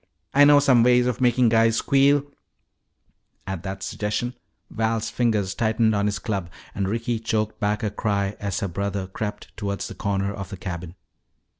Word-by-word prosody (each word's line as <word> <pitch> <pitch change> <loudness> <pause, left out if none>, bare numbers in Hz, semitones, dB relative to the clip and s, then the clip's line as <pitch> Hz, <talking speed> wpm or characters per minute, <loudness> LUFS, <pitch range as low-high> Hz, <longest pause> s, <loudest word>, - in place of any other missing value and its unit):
I 145 +1 +7
know 145 0 +7
some 135 -4 +5
ways 125 +1 +4
of 125 0 -1
making 125 -1 +4
guys 115 0 +4
squeal 140 +3 +3 0.7
" - - -45
At 95 -3 -4
that 95 0 -6
suggestion 105 +6 -2 0.4
Val's 110 0 -1
fingers 105 -5 0
tightened 110 0 +2
on 100 0 +1
his 100 - -1
club 100 -7 -3 0.2
and 95 -1 -2
Ricky 115 +1 -1
choked 110 -1 -2
back 105 +1 0
a 105 - -1
cry 100 -1 -1
as 100 -2 -3
her 100 - -1
brother 100 +1 -3
crept 105 +2 -6
toward 100 -1 -3
the - - -4
corner 100 -1 -1
of 100 -2 -7
the 100 - -7
cabin. 85 -1 -6
105 Hz, 175 wpm, -24 LUFS, 100-115 Hz, 0.7 s, I